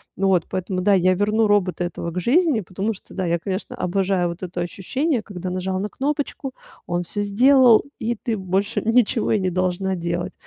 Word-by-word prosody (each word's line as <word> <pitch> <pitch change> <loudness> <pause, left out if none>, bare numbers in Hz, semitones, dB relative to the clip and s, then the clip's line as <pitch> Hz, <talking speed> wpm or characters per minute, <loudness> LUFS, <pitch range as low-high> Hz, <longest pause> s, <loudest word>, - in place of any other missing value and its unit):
вот 190 -2 +2
поэтому, 185 0 -2
да, 200 +2 +3
я 185 -1 +4
верну 210 +3 +2
робота 190 -3 +1
этого 170 -1 -4
к 180 - -3
жизни. 270 - +2
Потому 195 +5 -3
что, 195 - -15
да, 190 - -1
я, 170 0 0
конечно, 195 +7 -4
обожаю 185 -4 0
вот 170 +2 -7
это 175 -1 -4
ощущение, 235 - -1
когда 185 -3 -6
нажал 185 +1 -2
на 205 +2 -3
кнопочку, 280 0 -3 0.3
он 175 0 -1
всё 205 +4 -4
сделал, 245 +3 +5 0.2
и 235 +2 -1
ты 225 0 -3
больше 190 +3 -1
ничего 230 0 +2
и 215 - +3
не 185 -1 0
должна 185 +1 -1
делать. 175 +1 -3
195 Hz, 190 wpm, -22 LUFS, 180-220 Hz, 0.3 s, сделал